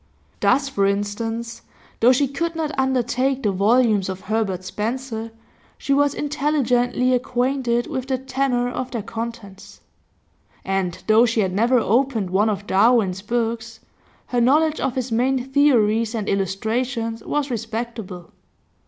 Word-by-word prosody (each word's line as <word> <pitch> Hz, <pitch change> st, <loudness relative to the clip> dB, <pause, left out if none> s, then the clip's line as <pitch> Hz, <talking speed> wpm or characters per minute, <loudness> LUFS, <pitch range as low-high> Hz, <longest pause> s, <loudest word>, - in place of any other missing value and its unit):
Thus, 275 Hz, 0 st, +2 dB
for 200 Hz, -7 st, +1 dB
instance, 225 Hz, +3 st, -3 dB, 0.4 s
though 240 Hz, +3 st, +6 dB
she 275 Hz, +2 st, +2 dB
could 330 Hz, +5 st, -3 dB
not 315 Hz, -2 st, -2 dB
undertake 265 Hz, 0 st, 0 dB
the 210 Hz, -, +2 dB
volumes 210 Hz, 0 st, +2 dB
of 190 Hz, 0 st, -5 dB
Herbert 195 Hz, -2 st, -2 dB
Spencer, 225 Hz, +4 st, -4 dB, 0.5 s
she 275 Hz, -, -1 dB
was 285 Hz, 0 st, +2 dB
intelligently 255 Hz, -4 st, +1 dB
acquainted 245 Hz, -1 st, 0 dB
with 265 Hz, -5 st, -4 dB
the 265 Hz, -1 st, 0 dB
tenor 260 Hz, -1 st, -1 dB
of 250 Hz, +1 st, -4 dB
their 235 Hz, -4 st, -4 dB
contents; 225 Hz, -3 st, -8 dB, 0.8 s
and 190 Hz, -2 st, -2 dB
though 225 Hz, +2 st, +5 dB
she 225 Hz, -1 st, +1 dB
had 190 Hz, -2 st, -1 dB
never 235 Hz, +6 st, +3 dB
opened 230 Hz, -4 st, +1 dB
one 205 Hz, +4 st, +3 dB
of 205 Hz, -1 st, -3 dB
Darwin's 200 Hz, -2 st, +3 dB
books, 230 Hz, +1 st, -3 dB, 0.5 s
her 245 Hz, -1 st, 0 dB
knowledge 305 Hz, +5 st, +3 dB
of 265 Hz, -, -1 dB
his 255 Hz, -2 st, -3 dB
main 250 Hz, +2 st, +1 dB
theories 230 Hz, -5 st, +3 dB
and 215 Hz, -2 st, -3 dB
illustrations 225 Hz, +4 st, -2 dB
was 290 Hz, -2 st, -2 dB
respectable. 225 Hz, -5 st, -5 dB
235 Hz, 135 wpm, -22 LUFS, 210-260 Hz, 0.8 s, though